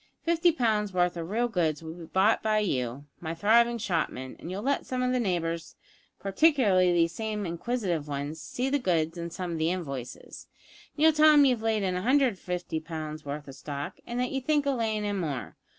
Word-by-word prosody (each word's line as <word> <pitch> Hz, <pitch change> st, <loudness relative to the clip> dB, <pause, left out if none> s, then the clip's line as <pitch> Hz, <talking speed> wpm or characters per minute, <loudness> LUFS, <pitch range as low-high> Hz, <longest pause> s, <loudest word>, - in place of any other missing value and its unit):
Fifty 340 Hz, +1 st, +3 dB
pounds' 215 Hz, -, 0 dB
worth 180 Hz, -1 st, +2 dB
of 170 Hz, 0 st, -5 dB
real 235 Hz, +4 st, +1 dB
goods 165 Hz, -8 st, 0 dB
will 160 Hz, 0 st, -6 dB
be 170 Hz, -1 st, -10 dB
bought 195 Hz, +6 st, +3 dB
by 215 Hz, -1 st, +1 dB
you, 135 Hz, -, -1 dB
my 165 Hz, -1 st, -4 dB
thriving 235 Hz, +6 st, +4 dB
shopman, 165 Hz, -, -2 dB
and -, -, -8 dB
you'll 195 Hz, +3 st, -4 dB
let 280 Hz, +2 st, 0 dB
some 255 Hz, -1 st, -1 dB
of 250 Hz, -, +1 dB
the 255 Hz, -, +1 dB
neighbours, 170 Hz, -6 st, -2 dB, 0.4 s
partiklerly 195 Hz, -, +3 dB
these 170 Hz, -1 st, +3 dB
same 215 Hz, -2 st, -3 dB
inquisitive 170 Hz, -3 st, -2 dB
'uns, 145 Hz, +3 st, -4 dB
see 250 Hz, +2 st, -3 dB
the 285 Hz, +1 st, +1 dB
goods 165 Hz, -7 st, 0 dB
and 170 Hz, -1 st, -5 dB
some 180 Hz, 0 st, -4 dB
of 165 Hz, -, -3 dB
the 160 Hz, +1 st, +2 dB
invoices, 140 Hz, -9 st, -6 dB, 0.5 s
and 300 Hz, -, -1 dB
you'll 320 Hz, 0 st, +7 dB
tell 305 Hz, +1 st, +7 dB
them 295 Hz, -1 st, +7 dB
that 275 Hz, -, +5 dB
you've 245 Hz, -3 st, 0 dB
laid 220 Hz, -2 st, +1 dB
in 185 Hz, -1 st, 0 dB
150 185 Hz, -, 0 dB
pounds 155 Hz, -1 st, -6 dB
worth 145 Hz, +1 st, -5 dB
of 135 Hz, -, -8 dB
stock, 140 Hz, +1 st, -6 dB
and 240 Hz, +1 st, -3 dB
that 250 Hz, 0 st, 0 dB
you 270 Hz, -, -2 dB
think 295 Hz, +2 st, +1 dB
of 275 Hz, -3 st, 0 dB
layin' 215 Hz, -2 st, 0 dB
in 205 Hz, -1 st, -1 dB
more. 145 Hz, -7 st, -4 dB
185 Hz, 210 wpm, -28 LUFS, 165-240 Hz, 0.5 s, you'll